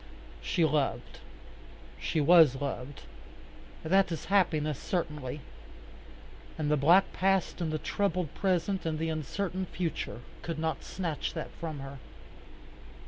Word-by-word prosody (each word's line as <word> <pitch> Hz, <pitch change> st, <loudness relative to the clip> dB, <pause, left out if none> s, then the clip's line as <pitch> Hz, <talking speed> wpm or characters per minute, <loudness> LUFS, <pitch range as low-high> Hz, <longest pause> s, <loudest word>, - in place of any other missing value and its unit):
She 170 Hz, -4 st, +2 dB
loved. 150 Hz, -2 st, -1 dB, 0.8 s
She 160 Hz, -, -1 dB
was 155 Hz, -2 st, +7 dB
loved. 140 Hz, -1 st, -5 dB, 0.8 s
That 190 Hz, +3 st, +3 dB
is 165 Hz, -, -4 dB
happiness 155 Hz, -6 st, +2 dB
certainly. 150 Hz, -6 st, -3 dB, 1.2 s
And 150 Hz, -2 st, 0 dB
the -, -, +5 dB
black 170 Hz, +7 st, +5 dB
past 190 Hz, -1 st, +1 dB
and 160 Hz, -2 st, -1 dB
the 155 Hz, -, 0 dB
troubled 180 Hz, -2 st, -1 dB
present 190 Hz, 0 st, 0 dB
and 160 Hz, -1 st, -1 dB
the 160 Hz, +1 st, -1 dB
uncertain 185 Hz, +5 st, -2 dB
future 165 Hz, -9 st, -3 dB, 0.2 s
could 165 Hz, -2 st, -4 dB
not 160 Hz, 0 st, -2 dB
snatch 170 Hz, -5 st, -3 dB
that 160 Hz, -, -4 dB
from 155 Hz, -4 st, -6 dB
her. 135 Hz, 0 st, -8 dB
160 Hz, 125 wpm, -30 LUFS, 150-180 Hz, 1.2 s, was